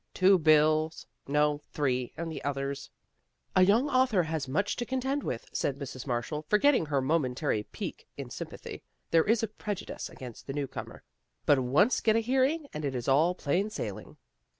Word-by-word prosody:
" -, -, -49 dB
Two 190 Hz, 0 st, +5 dB
bills 155 Hz, 0 st, +3 dB, 0.2 s
no, 150 Hz, +1 st, +2 dB
three, 125 Hz, -4 st, 0 dB
and 165 Hz, +1 st, -4 dB
the -, -, -6 dB
others 140 Hz, 0 st, -3 dB, 0.3 s
" -, -, -45 dB
A 185 Hz, -, +6 dB
young 210 Hz, +9 st, +4 dB
author 255 Hz, -9 st, +3 dB
has 160 Hz, -3 st, -3 dB
much 155 Hz, +10 st, 0 dB
to 245 Hz, -, -1 dB
contend 265 Hz, +3 st, -1 dB
with," 115 Hz, -, -4 dB
said 140 Hz, -, -1 dB
Mrs. 135 Hz, -2 st, -7 dB
Marshall, 125 Hz, +5 st, -2 dB
forgetting 230 Hz, -, +4 dB
her 140 Hz, -2 st, +1 dB
momentary 130 Hz, -4 st, 0 dB
pique -, -, -6 dB
in -, -, -7 dB
sympathy. -, -, -7 dB, 0.2 s
" -, -, -47 dB
There 165 Hz, -1 st, +5 dB
is 225 Hz, +1 st, +2 dB
a -, -, +1 dB
prejudice 210 Hz, -1 st, -5 dB
against 125 Hz, -3 st, -10 dB
the 135 Hz, -, -3 dB
newcomer, 140 Hz, -2 st, -5 dB, 0.4 s
but 145 Hz, -, +5 dB
once 140 Hz, -, +3 dB
get 220 Hz, -1 st, +3 dB
a -, -, +4 dB
hearing 265 Hz, +6 st, +1 dB
and 155 Hz, -, -5 dB
it 140 Hz, -2 st, -2 dB
is 120 Hz, -2 st, -4 dB
all 155 Hz, +7 st, +4 dB
plain 180 Hz, +7 st, 0 dB
sailing." 215 Hz, -, -6 dB
155 Hz, 185 wpm, -29 LUFS, 140-210 Hz, 0.4 s, A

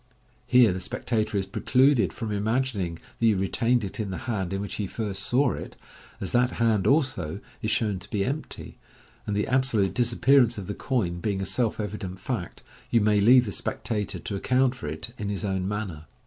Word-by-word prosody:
Here 120 Hz, -6 st, +6 dB
the 95 Hz, -, -4 dB
spectator 110 Hz, +1 st, -1 dB
is 95 Hz, -, 0 dB
precluded 130 Hz, +6 st, +3 dB
from 110 Hz, -3 st, -5 dB
imagining 105 Hz, -4 st, -1 dB, 0.2 s
that 115 Hz, -, +2 dB
you 105 Hz, -3 st, +4 dB
retained 115 Hz, +5 st, +1 dB
it 100 Hz, -, -5 dB
in 105 Hz, -2 st, -2 dB
the 95 Hz, -, -4 dB
hand 100 Hz, -7 st, -2 dB
in 95 Hz, -, -2 dB
which 100 Hz, -, -5 dB
he 100 Hz, -, -2 dB
first 100 Hz, -2 st, -3 dB
saw 125 Hz, +8 st, +2 dB
it, -, -, -7 dB, 0.4 s
as 95 Hz, -, -2 dB
that 125 Hz, 0 st, +2 dB
hand 110 Hz, -4 st, +2 dB
also 130 Hz, -, +1 dB, 0.2 s
is -, -, -1 dB
shown 105 Hz, -4 st, 0 dB
to 90 Hz, -, -12 dB
be 100 Hz, -2 st, 0 dB
empty, 145 Hz, +4 st, -5 dB, 0.5 s
and 105 Hz, -, -1 dB
the 105 Hz, -, +1 dB
absolute 125 Hz, -6 st, +2 dB
disappearance 120 Hz, 0 st, +3 dB
of 100 Hz, -, -5 dB
the 105 Hz, -, -4 dB
coin 95 Hz, -9 st, -1 dB
being 100 Hz, +2 st, -1 dB
a 95 Hz, -, -2 dB
self 115 Hz, +1 st, 0 dB
evident 105 Hz, -3 st, -4 dB
fact, 95 Hz, -2 st, -5 dB, 0.3 s
you 115 Hz, -, +4 dB
may 105 Hz, -1 st, +3 dB
leave 125 Hz, +4 st, +7 dB
the 105 Hz, -, -4 dB
spectator 105 Hz, +3 st, -3 dB
to 100 Hz, -, -5 dB
account 130 Hz, +5 st, +2 dB
for 105 Hz, -, -8 dB
it 80 Hz, +10 st, -6 dB
in 105 Hz, -1 st, -3 dB
his 100 Hz, +1 st, -2 dB
own 95 Hz, -1 st, -1 dB
manner. 100 Hz, -7 st, -4 dB
105 Hz, 200 wpm, -26 LUFS, 95-120 Hz, 0.5 s, leave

